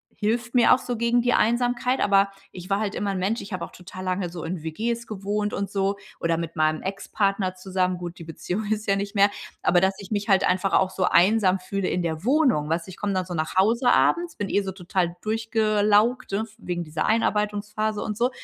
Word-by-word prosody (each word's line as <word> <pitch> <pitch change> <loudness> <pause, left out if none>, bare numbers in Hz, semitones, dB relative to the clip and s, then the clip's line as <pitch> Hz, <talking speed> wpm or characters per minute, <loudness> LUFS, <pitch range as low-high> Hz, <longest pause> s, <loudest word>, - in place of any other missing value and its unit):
hilft 230 +3 -1
mir 245 - +6
auch - - +3
so 245 - -4
gegen 235 +1 +2
die 245 +1 +2
Einsamkeit. 245 +2 +1
Aber 195 0 +4 0.2
ich 180 +1 -9
war 195 0 +1
halt 210 -2 -2
immer 205 - -2
'n 195 - -3
Mensch 205 +6 -1
ich 200 - -10
habe 185 -3 -3
auch - - -15
total 185 +1 -9
lange 185 -1 -1
so 170 -1 -7
in 165 -1 -4
WGs 230 +9 -3
gewohnt 210 0 -2
und 200 -1 -2
so 195 0 0 0.2
oder 165 -1 +1
mit 170 -1 -5
meinem 155 -1 +1
Ex-Partner 195 0 -1
zusammen 185 -1 -1
gut, 175 0 -7
die - - -8
Beziehung 180 +5 -4
ist 215 0 -1
ja 195 - +3
nicht 200 +1 -4
mehr. 200 0 +5 0.3
Aber, 175 0 +4
dass 190 0 +2
ich 200 0 -10
mich 205 0 -2
halt 195 0 +4
einfach 185 +2 +1
auch 185 0 +3
so 185 - -2
einsam 190 0 +4
fühle 190 +1 -2
in 180 - -1
der 160 0 -3
Wohnung, 255 - +2
weißt 165 +3 -1
du? - - -9
Ich - - -12
komm 205 -1 -2
dann 185 -1 -1
so 180 - -6
nach 160 +2 -3
Hause 230 +6 +4
abends, 345 -1 +2
bin 205 - -2
eh 200 - +2
so 195 -1 -4
total 180 -1 -2
durchgelaugt, 215 +1 +2
ne, 210 +3 -1
wegen 175 -5 -4
dieser 155 0 -2
Einarbeitungsphase 210 -1 0
und 210 - -3
so. 240 +2 +2
200 Hz, 230 wpm, -24 LUFS, 185-215 Hz, 0.3 s, mir